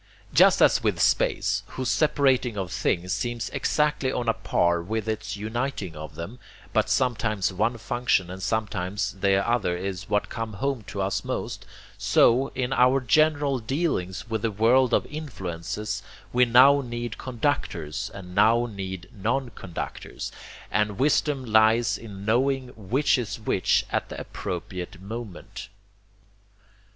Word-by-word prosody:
Just -, -, +6 dB
as -, -, +5 dB
with -, -, 0 dB
space, -, -, +2 dB
whose 130 Hz, -2 st, -2 dB
separating 130 Hz, -6 st, +2 dB
of 95 Hz, -3 st, -3 dB
things 90 Hz, +2 st, 0 dB
seems 120 Hz, +3 st, -3 dB
exactly 150 Hz, -3 st, +1 dB
on 120 Hz, -2 st, -2 dB
a 115 Hz, -, +4 dB
par 85 Hz, -4 st, +1 dB
with 110 Hz, +4 st, -3 dB
its 105 Hz, -2 st, -3 dB
uniting 110 Hz, -, -3 dB
of 75 Hz, 0 st, -8 dB
them, 100 Hz, +9 st, -7 dB, 0.3 s
but -, -, +2 dB
sometimes 110 Hz, -7 st, +1 dB
one 110 Hz, +5 st, 0 dB
function 115 Hz, -6 st, 0 dB
and 95 Hz, +1 st, -7 dB
sometimes 100 Hz, -1 st, -1 dB
the 95 Hz, 0 st, +2 dB
other 115 Hz, -7 st, +1 dB
is 95 Hz, 0 st, -5 dB
what 105 Hz, -, +1 dB
come 115 Hz, -1 st, -5 dB
home 135 Hz, +4 st, -2 dB
to 100 Hz, -, -3 dB
us 95 Hz, 0 st, -1 dB
most, -, -, -4 dB, 0.3 s
so, 130 Hz, +4 st, +4 dB
in 130 Hz, 0 st, -1 dB
our 125 Hz, +2 st, +4 dB
general 145 Hz, +2 st, +2 dB
dealings 110 Hz, -, -2 dB
with 110 Hz, -2 st, -2 dB
the 115 Hz, -, +1 dB
world 120 Hz, +5 st, +3 dB
of -, -, +2 dB
influences, 105 Hz, -, -5 dB, 0.3 s
we 125 Hz, +1 st, +5 dB
now 130 Hz, +4 st, +6 dB
need 120 Hz, -2 st, -5 dB
conductors 100 Hz, -, -2 dB
and 90 Hz, -2 st, -10 dB
now 110 Hz, +4 st, +4 dB
need 95 Hz, -5 st, -6 dB
non 120 Hz, +6 st, -1 dB
conductors, 95 Hz, -5 st, -6 dB, 0.4 s
and 105 Hz, 0 st, +1 dB
wisdom 140 Hz, -1 st, +1 dB
lies 110 Hz, +1 st, +4 dB
in 100 Hz, -3 st, -9 dB
knowing 130 Hz, +3 st, +1 dB
which 125 Hz, +6 st, +1 dB
is 110 Hz, -3 st, -4 dB
which 100 Hz, -3 st, +1 dB
at -, -, -1 dB
the -, -, -6 dB
appropriate 90 Hz, 0 st, -6 dB
moment. 105 Hz, -1 st, -8 dB
110 Hz, 140 wpm, -26 LUFS, 95-125 Hz, 0.4 s, Just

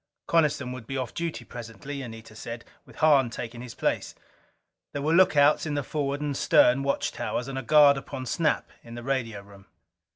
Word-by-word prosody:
Coniston 150 Hz, -6 st, +1 dB
would 125 Hz, -3 st, -8 dB
be 135 Hz, -, -3 dB
off 130 Hz, -3 st, -4 dB
duty 170 Hz, -1 st, -4 dB
presently, 120 Hz, +4 st, -7 dB
Anita 115 Hz, -3 st, -10 dB
said, 115 Hz, +1 st, -7 dB, 0.2 s
with -, -, -16 dB
Hahn 145 Hz, -5 st, +4 dB
taking 120 Hz, 0 st, -7 dB
his 125 Hz, -2 st, -9 dB
place. -, -, -1 dB, 0.8 s
There 145 Hz, -, -3 dB
were 155 Hz, +2 st, +1 dB
lookouts 155 Hz, -4 st, +5 dB
in 150 Hz, -, -2 dB
the 145 Hz, -, -1 dB
forward 140 Hz, 0 st, -2 dB
and 145 Hz, -2 st, -2 dB
stern 130 Hz, 0 st, +4 dB
watch 140 Hz, 0 st, 0 dB
towers, 120 Hz, -, -3 dB
and 135 Hz, -, -5 dB
a 135 Hz, -, -2 dB
guard 145 Hz, +1 st, +6 dB
upon 130 Hz, -1 st, -6 dB
Snap 150 Hz, +3 st, 0 dB
in 115 Hz, 0 st, -10 dB
the 120 Hz, -, -7 dB
radio 120 Hz, -6 st, -2 dB
room. 100 Hz, -1 st, -17 dB
135 Hz, 190 wpm, -27 LUFS, 120-145 Hz, 0.8 s, guard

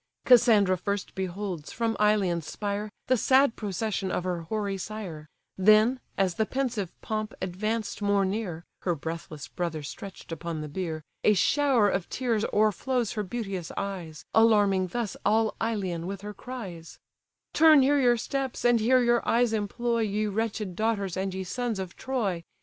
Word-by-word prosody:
Cassandra 220 Hz, -7 st, +6 dB
first 200 Hz, -1 st, -3 dB
beholds, 185 Hz, -3 st, -4 dB
from 225 Hz, -1 st, -1 dB
Ilion's 195 Hz, -6 st, +2 dB
spire, 205 Hz, 0 st, -3 dB, 0.2 s
The 255 Hz, -, +3 dB
sad 265 Hz, +1 st, +4 dB
procession 205 Hz, -1 st, -2 dB
of -, -, -1 dB
her 180 Hz, -2 st, -2 dB
hoary 200 Hz, +3 st, -3 dB
sire; 185 Hz, -7 st, -6 dB, 0.3 s
Then, 215 Hz, +6 st, +5 dB, 0.2 s
as 190 Hz, -2 st, +2 dB
the 220 Hz, +4 st, 0 dB
pensive 245 Hz, -8 st, -2 dB
pomp 215 Hz, 0 st, -3 dB
advanced 215 Hz, +4 st, -3 dB
more 200 Hz, -1 st, +2 dB
near, 190 Hz, -4 st, -3 dB, 0.2 s
(Her 175 Hz, -2 st, -1 dB
breathless 160 Hz, -1 st, -6 dB
brother 170 Hz, -4 st, -4 dB
stretched 190 Hz, +5 st, -9 dB
upon 165 Hz, -1 st, -4 dB
the 155 Hz, -, -5 dB
bier,) 160 Hz, 0 st, -4 dB, 0.2 s
A 210 Hz, -, +5 dB
shower 265 Hz, +1 st, +3 dB
of 190 Hz, -3 st, -1 dB
tears 235 Hz, -4 st, 0 dB
o'erflows 215 Hz, +3 st, +1 dB
her 215 Hz, -, -2 dB
beauteous 195 Hz, -5 st, -4 dB
eyes, 180 Hz, -6 st, -5 dB
Alarming 205 Hz, -4 st, +4 dB
thus 230 Hz, +2 st, -3 dB
all 220 Hz, +1 st, +2 dB
Ilion 190 Hz, -7 st, -2 dB
with 195 Hz, 0 st, -5 dB
her 210 Hz, +1 st, -6 dB
cries: 195 Hz, -9 st, -8 dB, 0.6 s
"Turn 310 Hz, -3 st, +7 dB
here 285 Hz, +2 st, +3 dB
your 245 Hz, -2 st, +4 dB
steps, 270 Hz, +2 st, -3 dB
and 240 Hz, -1 st, +5 dB
here 250 Hz, +3 st, +4 dB
your 240 Hz, 0 st, +3 dB
eyes 235 Hz, -1 st, +3 dB
employ, 230 Hz, +3 st, -1 dB
Ye 215 Hz, -1 st, 0 dB
wretched 210 Hz, -2 st, -2 dB
daughters, 205 Hz, -3 st, -1 dB
and 190 Hz, +1 st, -2 dB
ye 190 Hz, 0 st, -4 dB
sons 240 Hz, +3 st, -2 dB
of 185 Hz, -2 st, -5 dB
Troy! 210 Hz, -10 st, -2 dB
205 Hz, 160 wpm, -27 LUFS, 185-230 Hz, 0.6 s, Turn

